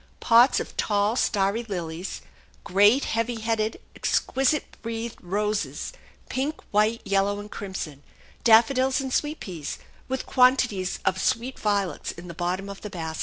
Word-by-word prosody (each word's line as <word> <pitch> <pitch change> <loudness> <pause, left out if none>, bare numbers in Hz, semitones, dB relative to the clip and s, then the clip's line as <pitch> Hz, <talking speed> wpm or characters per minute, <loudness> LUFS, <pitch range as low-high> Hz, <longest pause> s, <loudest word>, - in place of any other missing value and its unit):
Pots 240 +3 +5
of - - -6
tall 205 +1 +1
starry 200 -2 +1
lilies, 180 -4 -5 0.4
great, 205 +8 +4
heavy 230 +1 -1
headed, 220 -1 -1 0.2
exquisite 270 +3 +1
breathed 230 0 -5
roses, 210 - -2 0.3
pink, 280 +4 -2
white, 215 +2 +2
yellow, 200 +1 +1
and 205 0 -9
crimson; 185 -8 -6 0.4
daffodils 255 +4 +5
and 265 -1 -3
sweet 295 +1 0
peas, 165 -6 -6 0.3
with 265 0 -3
quantities 250 -7 +3
of 190 -1 +1
sweet 245 +3 0
violets 200 -3 -1
in 170 +1 -11
the 170 - -7
bottom 180 +3 -2
of 200 0 -8
the 210 - -6
basket. 160 -4 -5
210 Hz, 140 wpm, -25 LUFS, 190-240 Hz, 0.4 s, Pots